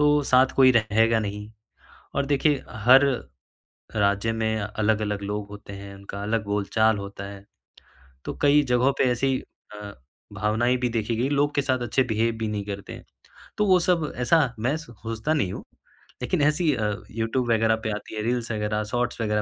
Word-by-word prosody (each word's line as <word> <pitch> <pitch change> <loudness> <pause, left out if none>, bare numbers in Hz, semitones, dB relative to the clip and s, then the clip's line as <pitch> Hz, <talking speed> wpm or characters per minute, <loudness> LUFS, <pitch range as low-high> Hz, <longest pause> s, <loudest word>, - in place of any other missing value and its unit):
तो 150 0 +4
साथ 130 -1 +5
कोई 130 -1 +7
रहेगा 115 0 +3
नहीं 105 0 -5 0.7
और 140 0 0
देखिए 145 0 +1
हर 125 +6 +5 0.9
राज्य 100 +1 +1
में 110 -1 -1
अलग-अलग 105 0 -1
लोग 105 0 -4
होते 105 -1 -10
हैं, 100 0 -9
उनका 100 +1 -8
अलग 110 +1 -1
बोलचाल 105 +2 +1
होता 100 0 -7
है, 100 0 -10 0.8
तो - - -4
कई 145 +1 +5
जगहों 125 +1 +2
पर - - +5
ऐसी 130 +2 +1 0.4
अ, 105 -1 -8 0.4
भावनाएँ 110 +5 +1
भी 125 - 0
देखी 115 -1 -1
गई, 125 +4 0
लोग 145 0 +1
के 140 - +2
साथ 130 -2 0
अच्छे 130 +2 +1
बिहेव 115 -1 0
भी 110 -1 -2
नहीं 105 -1 -3
करते 100 -1 -6
हैं। - - -10 0.5
तो 210 - +2
वो 185 -1 +5
सब 170 -4 +1
ऐसा 130 0 +2
मैं 130 +6 0
स 165 - -9
सोचता 115 +6 -3
नहीं 120 -12 0
हूँ, - - -7 0.6
लेकिन 150 +5 0
ऐसी 150 +1 +2
अ, 105 -2 -1 0.2
यूट्यूब 115 +3 -1
वग़ैरह 110 0 +3
पे 110 - -1
आती 105 +1 -8
है 105 - -2
रील्स 120 0 -1
वग़ैरह 105 0 -1
शॉर्ट्स 120 -1 -1
वग़ैरह 105 -1 0
115 Hz, 180 wpm, -25 LUFS, 105-130 Hz, 0.9 s, कोई